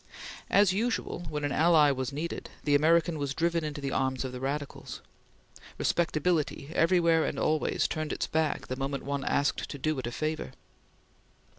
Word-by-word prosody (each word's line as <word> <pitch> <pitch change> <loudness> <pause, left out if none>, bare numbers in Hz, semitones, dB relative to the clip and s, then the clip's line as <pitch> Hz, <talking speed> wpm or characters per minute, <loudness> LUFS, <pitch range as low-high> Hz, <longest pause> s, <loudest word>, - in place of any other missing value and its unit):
As 200 -2 +5
usual, 210 -5 -2
when 150 -1 -3
an 145 - 0
ally 155 -1 +5
was 130 -2 -2
needed, 155 +4 -4
the 145 - +1
American 160 +2 +3
was 140 -1 -2
driven 170 0 +1
into 150 -1 -4
the 135 -1 -2
arms 130 0 0
of 130 - -4
the 125 - -6
radicals. 140 +2 -4 0.8
Respectability, 160 -3 0
everywhere 165 -2 +4
and - - -2
always, 155 0 +1
turned 155 -1 -3
its - - -1
back 160 -1 -1
the 130 - -4
moment 135 +1 -3
one 140 0 -2
asked 145 0 0
to - - -6
do 155 +1 -1
it 125 - -4
a - - -4
favor. 155 - -3
150 Hz, 170 wpm, -29 LUFS, 140-165 Hz, 0.8 s, As